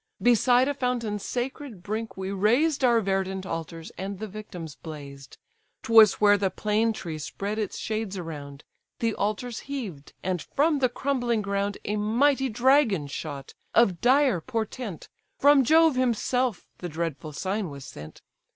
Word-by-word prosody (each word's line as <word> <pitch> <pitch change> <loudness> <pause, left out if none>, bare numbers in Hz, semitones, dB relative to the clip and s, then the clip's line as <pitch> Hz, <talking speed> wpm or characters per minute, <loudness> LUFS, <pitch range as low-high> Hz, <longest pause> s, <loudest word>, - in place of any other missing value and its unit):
Beside 245 +2 +4
a 285 - 0
fountain's 240 -6 -2
sacred 245 -5 -4
brink 220 +2 -4
we 190 0 -4
raised 245 +10 +2
Our 235 -2 +4
verdant 190 -1 -1
altars, 165 -1 -6
and 195 +1 -4
the 215 - -5
victims 185 -6 -8
blazed: 140 -3 -10 0.5
'Twas 225 -2 +7
where 205 -1 +4
the 195 -1 +1
plane 215 +3 +1
tree 165 -7 -6
spread 200 +7 -4
its 210 - -3
shades 215 -3 -3
around, 145 -5 -7 0.3
The 230 -1 0
altars 215 +4 -2
heaved; 205 - -6
and 185 -2 -1
from 300 +1 +1
the 255 -2 +3
crumbling 245 -4 -1
ground 200 0 -1
A 210 +1 -1
mighty 265 +6 +2
dragon 240 - +3
shot, 140 -1 -6 0.2
of 195 -7 +4
dire 255 - +4
portent; 220 -1 -4 0.3
From 285 -1 +6
Jove 320 +2 +5
himself 250 -2 0
the 175 - -5
dreadful 155 -2 -4
sign 190 +5 -2
was 140 -2 -9
sent. 80 - -11
210 Hz, 150 wpm, -26 LUFS, 180-245 Hz, 0.5 s, Twas